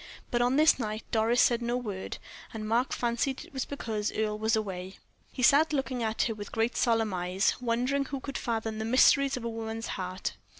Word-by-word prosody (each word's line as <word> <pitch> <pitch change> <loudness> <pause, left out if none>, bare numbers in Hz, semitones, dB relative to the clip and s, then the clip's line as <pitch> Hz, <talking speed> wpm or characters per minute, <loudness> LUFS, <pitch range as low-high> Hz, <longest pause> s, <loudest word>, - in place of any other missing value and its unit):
But 240 -2 +1
on 245 +2 +2
this 310 -1 +5
night 215 -2 -3
Doris 230 +2 +2
said 240 -1 +4
no 240 +1 0
word, 205 -6 -5 0.4
and 215 -1 -4
Mark 235 +4 +1
fancied 240 +3 -1
it - - -19
was 265 -2 -2
because 220 -6 -3
Earle 215 -1 -1
was 220 +1 +2
away. 190 -3 -4 0.3
He 255 - -4
sat 305 +5 +5
looking 265 -3 -1
at 220 -1 0
her 225 - 0
with 205 -1 -8
great 225 +2 0
solemn 225 -4 +2
eyes, 180 +2 +1
wondering 250 +4 0
who 275 0 -4
could 275 +1 -5
fathom 225 -2 -2
the - - -2
mysteries 270 +3 +4
of 245 - -6
a - - -2
woman's 225 0 -5
heart. 185 +1 -4
230 Hz, 205 wpm, -29 LUFS, 215-250 Hz, 0.4 s, this